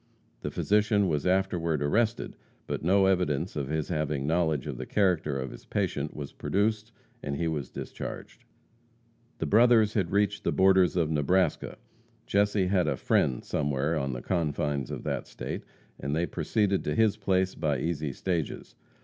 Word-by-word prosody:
The - - -3
physician 105 -1 +2
was 75 -1 0
afterward 90 -5 +1
arrested, 110 +10 0 0.3
but - - -3
no 95 +4 +4
evidence 90 -3 +1
of 70 -3 -2
his 80 +1 -2
having 75 -4 -1
knowledge 80 -3 +1
of 75 -4 -5
the 65 - -5
character 85 -8 +1
of 65 -1 -4
his - - -11
patient - - -2
was 70 -2 -6
produced, 110 +2 -1 0.3
and 70 - -3
he 85 +3 -1
was 75 -5 -3
discharged. - - -7 0.9
The - - -2
brothers 110 -1 +5
had 95 -6 0
reached 100 0 +1
the - - +1
borders 95 -2 +4
of 80 -3 +1
Nebraska. 90 +5 +1 0.5
Jesse 100 -1 +2
had 90 -1 +2
a - - 0
"friend" 65 -2 +1
somewhere 75 +1 0
on 70 -3 -1
the - - -6
confines 75 -5 -1
of - - -5
that - - -3
state, - - -5 0.4
and 70 +2 -2
they 85 +2 +1
proceeded 100 +1 0
to - - -1
his 110 -2 +3
place 95 -3 +1
by 75 -4 -1
easy 75 -2 -2
stages. 85 +2 -3
85 Hz, 165 wpm, -28 LUFS, 75-100 Hz, 0.9 s, brothers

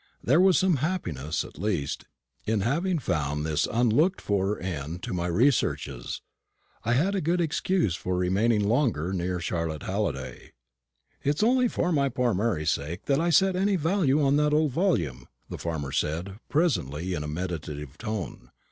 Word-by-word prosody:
There 145 +8 +4
was 190 -1 +5
some 185 -5 +3
happiness, 90 - -2
at - - -13
least, 90 -8 -2 0.4
in 110 -2 +1
having 165 - +1
found 75 - -1
this 75 -1 +1
unlooked 125 - +3
for 100 0 0
end 85 -1 -5
to - - -4
my 90 -1 -1
researches. 85 - 0 0.6
I 120 - +1
had 170 +11 +2
a 195 - 0
good 170 +4 +1
excuse 170 - +1
for 90 +1 -2
remaining 100 +4 +2
longer 110 - +1
near 90 0 -1
Charlotte 85 -3 -3
Halliday. 65 -2 -3 0.7
"It's 145 +7 +1
only 250 +2 +4
for 180 -5 -1
my 140 -4 +2
poor 125 -2 +1
Mary's 95 -6 +1
sake 80 +5 -4
I 160 +5 +2
set 190 +2 +4
any 195 +2 +2
value 165 -4 +2
on 140 +1 +3
that 150 0 +3
old 155 -2 +2
volume," 120 - 0 0.2
the - - -5
farmer 80 -5 -3
said, 85 +8 -2
presently, 95 - 0
in 75 -4 -2
a - - -4
meditative 75 -4 -5
tone. 105 - -5
105 Hz, 160 wpm, -27 LUFS, -, 0.7 s, was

